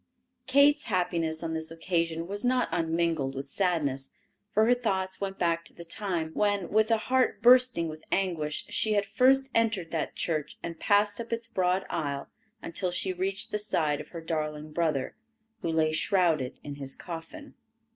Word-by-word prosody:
Kate's 285 +2 +5
happiness 170 -5 0
on 165 -1 -2
this 160 0 -2
occasion 165 0 -1
was 200 +2 -2
not 250 0 +2
unmingled 165 -4 0
with 135 +1 -4
sadness, 145 -5 0 0.4
for 215 +1 +3
her 245 - +5
thoughts 190 -6 -2
went 195 -1 -3
back 170 -1 +1
to - - -9
the 170 - -10
time 170 -3 -2
when, 205 -4 +1
with 220 +1 +3
a 225 - +4
heart 255 +3 +1
bursting 250 -8 +6
with 155 0 -8
anguish, 165 -6 -1
she 215 - +1
had 205 -1 +2
first 265 +5 +3
entered 220 -7 +1
that 160 -3 -2
church 155 -4 -2
and 170 -1 -6
passed 205 +2 +2
up 230 - -9
its 230 0 -2
broad 185 -3 0
aisle 140 -4 -3 0.3
until 180 +2 -1
she 185 +1 0
reached 190 +2 -2
the 210 - -1
side 155 -8 0
of - - -12
her 170 - -7
darling 155 -2 -3
brother, 150 -5 -1 0.5
who - - -2
lay 160 -1 +2
shrouded 160 -6 +1
in 145 -1 -7
his 135 -1 -5
coffin. 175 - -8
175 Hz, 175 wpm, -28 LUFS, 160-210 Hz, 0.5 s, bursting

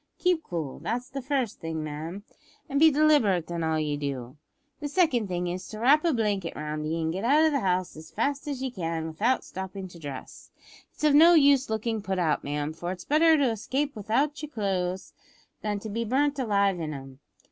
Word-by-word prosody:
Keep 360 -3 +2
cool. 165 - -5
That's 240 - -3
the 275 +1 -4
first 260 -4 -1
thing, 160 -2 -4
ma'am; 160 +6 -6 0.4
and 280 -2 0
be 320 +1 +8
deliberate 275 - +3
in 170 -1 -2
all 160 0 +1
ye 150 -1 -1
do. 135 -3 -5 0.4
The 295 - -3
second 280 - +2
thing 180 -1 -2
is, 180 +1 -4
to 215 - -8
wrap 280 +6 +5
a 340 - +3
blanket 205 - -1
round 150 0 -4
ye, 165 +2 -1
an' 160 0 0
get 190 +4 -4
out 295 +6 +5
of 315 - +3
the 280 - +1
house 185 -3 0
as 155 +1 -11
fast 280 +6 -2
as 275 -3 -3
ye 260 - -2
can 165 -6 -3
without 210 +11 0
stoppin' 190 0 -6
to 175 - -13
dress. 140 -4 -9 0.4
It's - - -13
of 300 -1 +5
no 330 +4 +8
use 280 -4 +5
lookin' 220 0 -1
put 190 -1 -2
out, 165 -4 +1
ma'am; 145 +1 -3
for 175 +2 -5
it's 180 -2 -7
better 320 +2 +5
to 270 -5 +2
escape 270 +6 -2
without 235 +9 0
yer 300 - -6
clo'es 190 -6 -2 0.5
than 210 -1 -1
to 220 - -6
be 230 +3 -1
burnt 280 +5 +1
alive 200 -6 +2
in 155 -2 -4
'em. 135 -1 -10
205 Hz, 210 wpm, -27 LUFS, 165-275 Hz, 0.5 s, be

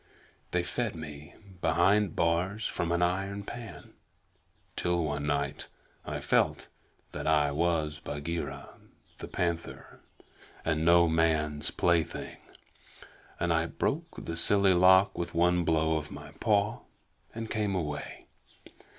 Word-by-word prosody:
They 90 0 0
fed 110 +4 -2
me 75 -2 -9 0.3
behind 95 +2 +3
bars 90 +6 0
from 85 0 -2
an 85 +1 +2
iron 95 +3 -1
pan 115 -2 -9 0.8
till 85 -1 0
one 75 -1 -2
night 70 -1 -1 0.4
I - - -4
felt - - +1 0.4
that - - -5
I 75 -2 +3
was 80 -1 0
Bagheera 80 +3 -5 0.5
the - - -6
Panther 85 -2 -3 0.7
and 80 -1 +1
no 85 +1 +6
man's 80 -2 +1
plaything, 85 -2 0 1.0
and 85 -1 +1
I 80 +1 +1
broke 165 - -3
the 85 0 -4
silly 100 +2 +4
lock 95 +2 +5
with 85 0 -4
one 90 +1 +3
blow 80 -1 +2
of 75 -1 -5
my - - -10
paw 105 0 +2 0.6
and 115 0 -4
came 105 -3 0
away. 75 -5 -4
85 Hz, 125 wpm, -29 LUFS, 80-95 Hz, 1.0 s, no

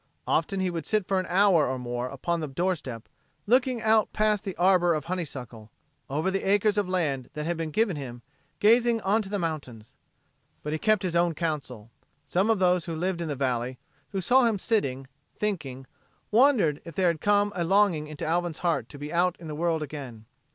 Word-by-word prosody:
Often 190 +4 0
he 185 -1 0
would 165 -1 -5
sit 215 -4 0
for 190 -1 +1
an 185 - -3
hour 185 -3 +4
or 130 +1 -2
more 120 0 -3
upon 170 +6 -2
the 155 - -3
door 175 +7 0
step, 125 -8 -8 0.4
looking 250 0 +2
out 220 -1 +3
past 210 -1 +1
the 195 - -5
arbor 175 -2 +4
of 150 - -4
honeysuckle, 130 -11 -6 0.4
over 155 +7 0
the 195 - -1
acres 205 +1 +2
of 205 -3 0
land 150 -9 -1
that 150 0 -3
had 170 +1 -1
been 165 -1 -3
given 205 +3 +1
him, 120 -4 -7 0.4
gazing 230 +2 +4
on 205 +4 +2
to 195 - -7
the 205 - -1
mountains. 145 - -5 0.7
But 150 - -3
he 155 - -2
kept 215 -1 +2
his 175 -2 -2
own 170 -1 +2
counsel. 135 -9 -4 0.3
Some 185 +8 +1
of 225 - +3
those 180 -2 +2
who 165 - -4
lived 175 +1 -2
in 170 - -3
the 145 - -2
valley, 125 -1 -1 0.3
who 195 -2 -3
saw 250 +6 +4
him 225 -3 +2
sitting, 140 - -1 0.3
thinking, 145 -11 -3 0.5
wondered 220 - +4
if 170 -3 -10
there 190 - +1
had 165 -2 -2
come 205 0 +2
a 175 - 0
longing 180 -4 +2
into 155 -1 -6
Alvin's 170 0 -1
heart 140 -9 0
to - - -10
be 145 +2 -7
out 175 +1 +2
in 170 - -11
the 155 - -5
world 165 0 0
again. 130 -7 -8
170 Hz, 205 wpm, -27 LUFS, 145-195 Hz, 0.7 s, hour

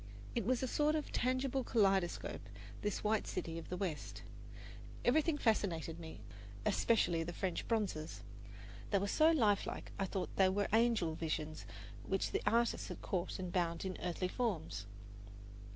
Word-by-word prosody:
It 230 -4 -1
was 255 0 +2
a - - +1
sort 300 +4 +2
of 305 - -2
tangible 255 +1 +1
kaleidoscope, 195 -7 +2 0.4
this 210 -1 -1
white 215 0 +1
city 165 -2 -3
of - - -10
the 180 - -2
West. 175 -6 -4 0.8
Everything 300 +4 +4
fascinated 170 - +1
me, 160 -9 -8 0.4
especially 175 -8 +3
the 165 +1 -3
French 185 0 -2
bronzes. 200 -9 -1 0.7
They 200 - +3
were 195 - +1
so 310 +9 +5
lifelike, 220 -11 +2
I 195 - +2
thought 190 0 -3
they 190 -1 +6
were 200 +2 +1
angel 225 -8 +3
visions 155 -1 -3 0.4
which 195 0 0
the - - 0
artist 235 +2 +2
had - - -7
caught 180 -3 -1
and 185 -1 -4
bound 170 -1 0
in 185 -1 -2
earthly 180 +1 -1
forms. 170 - -2
195 Hz, 150 wpm, -36 LUFS, 170-235 Hz, 0.8 s, they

